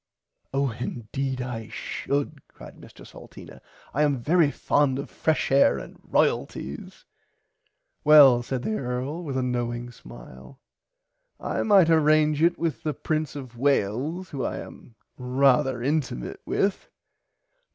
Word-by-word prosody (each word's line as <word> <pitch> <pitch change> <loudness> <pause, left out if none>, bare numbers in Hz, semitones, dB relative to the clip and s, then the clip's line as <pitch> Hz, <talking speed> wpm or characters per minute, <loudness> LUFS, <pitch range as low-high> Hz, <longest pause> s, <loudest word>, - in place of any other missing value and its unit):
Oh 135 -1 0
indeed 125 +3 -4
I 115 -3 -6
should 140 0 -4
cried - - -14
Mr - - -14
Salteena - - -13 0.3
I 145 - 0
am 145 -2 +2
very 155 +5 +3
fond 145 -2 +1
of 140 - -6
fresh 160 -3 -1
air 135 +1 +4
and - - -10
royalties. 70 +2 -2 1.0
Well 140 -5 +7
said 125 0 -4
the 215 +6 -1
earl 130 +7 -4
with 140 -5 -4
a 130 - 0
knowing 120 -1 -3
smile 65 - -14 0.8
[Pg - - -7
58] - - -1
I - - +2
might 195 -6 +5
arrange 155 -1 +3
it 170 +1 +3
with 165 -1 -2
the 155 -3 -3
prince 155 -2 -2
of 125 -4 -9
Wales 140 - 0
who 135 -3 -4
I - - -3
am 115 - -11 0.2
rarther 130 0 +2
intimate 140 - -2
with. 195 0 -1
135 Hz, 140 wpm, -25 LUFS, 125-155 Hz, 1.0 s, Well